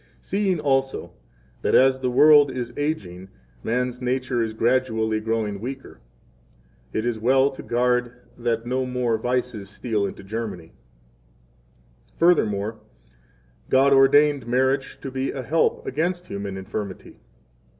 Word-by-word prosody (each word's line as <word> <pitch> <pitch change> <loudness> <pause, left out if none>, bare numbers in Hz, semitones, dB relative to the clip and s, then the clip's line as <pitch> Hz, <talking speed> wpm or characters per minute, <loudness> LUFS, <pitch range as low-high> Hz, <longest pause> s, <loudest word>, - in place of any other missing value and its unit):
] - - -33
14 - - -33
Seeing 195 -3 0
also 135 -2 0 0.5
that, - - +1
as 130 0 +5
the 130 -1 -1
world 145 +2 +6
is 125 -2 -5
aging, 95 - -4 0.3
man's 125 +1 -2
nature 125 -1 -1
is 110 -1 -2
gradually 110 -2 +1
growing 110 -2 -2
weaker, 130 - -7 0.9
it 110 - -2
is 120 -2 -1
well 130 +4 +3
to - - -9
guard 125 0 +1 0.2
that 115 -1 -2
no 130 +1 -1
more 125 -3 0
vices 125 -4 -2
steal 105 -1 -2
into 100 - -9
Germany. 100 -5 -6 1.4
15 - - -33
Furthermore, 110 - +2 0.9
God 135 +1 +4
ordained 140 -1 +4
marriage 130 +2 0
to 135 - -6
be 130 +1 -2
a 130 - -5
help 160 +6 +1
against 175 +5 -2
human 100 -1 -5
infirmity. 95 0 -7
125 Hz, 135 wpm, -23 LUFS, 110-135 Hz, 1.4 s, world